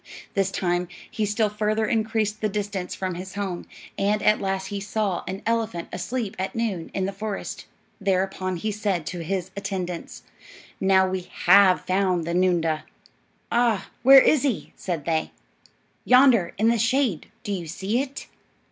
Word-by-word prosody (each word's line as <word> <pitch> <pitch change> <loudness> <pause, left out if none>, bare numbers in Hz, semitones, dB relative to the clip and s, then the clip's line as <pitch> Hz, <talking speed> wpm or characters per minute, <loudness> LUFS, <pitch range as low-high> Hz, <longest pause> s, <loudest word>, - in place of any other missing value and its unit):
This 195 -1 +1
time 175 -2 -1 0.2
he 215 -2 -1
still 210 +1 +1
further 215 +1 0
increased 220 -1 0
the 215 - +1
distance 200 -2 -3
from 185 -1 -3
his 185 +2 -7
home, 195 -4 -4 0.3
and 205 +1 +1
at 215 - +4
last 190 -1 -2
he 200 - -3
saw 200 -2 -1
an 190 +1 -5
elephant 225 -7 -1
asleep 210 +3 -3
at 190 - -3
noon 210 -8 -2
in 190 - 0
the 195 - -2
forest. 200 0 -5 0.3
Thereupon 190 -1 0
he 215 +5 -2
said 200 -6 -1
to 175 +3 -5
his 185 +2 -3
attendants, 185 -3 -5 0.6
"Now 190 0 +4
we 185 -1 -4 0.2
have 185 0 +7
found 185 -3 +1
the 170 - -2
noondah." 170 -4 +1 0.7
"Ah, 235 -4 +1
where 270 +3 +9
is 300 0 +4
he?" 270 -7 -2
said 170 -6 -4
they. 160 -2 0 0.7
"Yonder, 250 -8 +5
in 220 +3 +3
the 235 -1 +2
shade. 230 - +1 0.2
Do 210 - -4
you 180 -4 -3
see 195 +9 -1
it?" 280 0 -6
195 Hz, 160 wpm, -24 LUFS, 185-215 Hz, 0.7 s, where